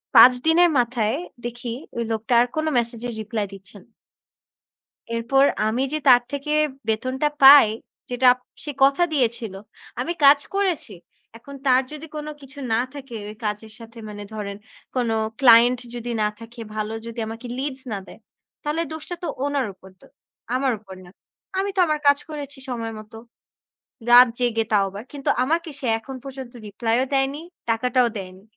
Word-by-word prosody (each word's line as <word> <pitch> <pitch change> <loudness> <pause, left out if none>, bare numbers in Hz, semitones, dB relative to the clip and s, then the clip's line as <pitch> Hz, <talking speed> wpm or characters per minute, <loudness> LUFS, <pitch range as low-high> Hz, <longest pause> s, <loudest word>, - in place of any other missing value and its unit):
৫ 250 - +10
দিনের 345 +2 +5
মাথায় 235 -2 0 0.3
দেখি 240 0 -5 0.3
ঐ - - -1
লোকটা 225 +2 -1
আর 245 - +2
কোনো 315 0 0
মেসেজের 235 0 -2
রিপ্লাই 215 -1 -3
দিচ্ছেনা। 195 +2 -13 1.3
এরপর 250 +4 +3 0.2
আমি 230 +4 0
যে 310 - 0
তার 245 -1 +7
থেকে 285 +1 -3 0.4
বেতনটা 255 +6 0
পাই, 275 -3 +10 0.4
যেটা 250 +1 +1
আপ - - -20 0.3
সে 300 - -4
কথা 275 +5 +3
দিয়েছিল, 235 -7 0 0.5
আমি 320 +7 -1
কাজ 280 +1 +8
করেছি, 360 - -1 0.4
এখন 280 +5 -12
তার 255 0 +5
যদি 305 +1 -8
কোনো 300 0 -5
কিছু 275 +1 -13
না 225 - +3
থাকে, 270 -4 -9
ঐ - - -6
কাজের 210 +1 -4
সাথে 230 0 -12
মানে 205 -1 -8
ধরেন 200 -2 -5 0.4
কোনো 235 -3 +1 0.3
client 245 -1 +7 0.2
যদি 240 0 -5
না 210 - +2
থাকে, 230 +1 -11
ভালো 215 0 -3
যদি 230 +1 -8
আমাকে 225 +3 -7
leads 270 -1 -4
না 205 - -2
দেয়, - - -14 0.4
তাহলে 300 +3 -1
দোষটা 315 +3 -6
তো 345 - -3 0.2
ওনার 285 -3 0
উপর 190 +1 -16
তো। - - -18 0.5
আমার 260 0 +1
উপর 195 -2 -12
না। 180 - -14 0.5
আমি 395 +1 0
তো - - +3
আমার 305 -1 0
কাজ 285 0 +6
করেছি 290 -2 -7
সময় 230 -2 -4
মতো। 215 +1 -13 0.9
রাত 245 +1 +9
জেগে 235 -2 +1
তাও 205 -2 +4
আবার। 200 +3 -8
কিন্তু 280 -2 -5
আমাকে 325 +5 0
সে 260 - -4
এখন 265 +4 -9
পর্যন্ত 265 -2 -8
রিপ্লাই 225 +3 -1
ও - - +1
দেয়নি, 270 +2 0 0.3
টাকাটাও 245 +2 +2
দেয়নি। 185 -1 -8
245 Hz, 165 wpm, -23 LUFS, 225-280 Hz, 1.3 s, ৫